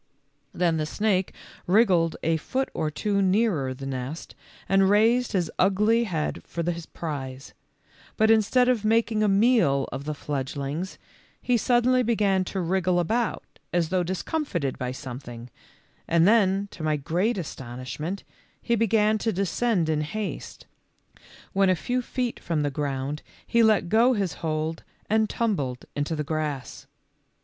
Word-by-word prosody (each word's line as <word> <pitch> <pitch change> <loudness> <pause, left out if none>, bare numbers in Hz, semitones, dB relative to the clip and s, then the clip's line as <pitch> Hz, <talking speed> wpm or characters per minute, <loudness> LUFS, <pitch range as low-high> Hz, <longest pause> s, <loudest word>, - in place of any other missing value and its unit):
Then 170 -2 +1
the 155 -1 -1
snake 195 +1 0 0.4
wriggled 180 -5 +4
a 165 0 +2
foot 260 - -2
or 155 - -1
two 200 +6 0
nearer 190 - +2
the 135 +1 -7
nest 135 +4 -5 0.3
and 195 0 +4
raised 230 +4 +3
his 175 -5 0
ugly 210 +5 +3
head 165 -7 -2
for 170 - -4
his 170 -1 -7
prize, 135 -4 -6 0.6
but 220 0 +4
instead 225 +3 +4
of 245 -4 +2
making 220 0 +2
a 215 - +3
meal 195 - +3
of 140 - -5
the 150 0 -3
fledgelings, 145 +5 -4 0.4
he 250 - +1
suddenly 245 +2 +3
began 210 -5 +2
to 190 - -4
wriggle 180 0 +1
about 225 +7 0 0.3
as 170 -2 +1
though 185 0 +1
discomfited 180 - -2
by 125 0 -2
something, 125 -2 -8 0.6
and 170 +1 +4
then 200 -2 +3
to - - -10
my 155 -1 +1
groat 180 - 0
astonishment 145 +4 -5 0.4
he 235 - -1
began 220 -1 +3
to 225 - 0
descend 195 -1 0
in 155 -1 +1
haste, 205 +7 -5 0.9
when 195 0 +3
a 185 - +4
few 250 +9 -1
feet 245 -1 -3
from 160 -3 -1
the 145 - 0
ground 140 +1 -3 0.2
he 235 - +3
let 215 -6 +4
go 230 +7 +4
his 195 - -1
hold 160 0 -2 0.3
and 220 -1 +3
tumbled 145 - -1
into 145 +3 -1
the 150 - -2
grass. 150 -3 -4
185 Hz, 150 wpm, -26 LUFS, 150-220 Hz, 0.9 s, wriggled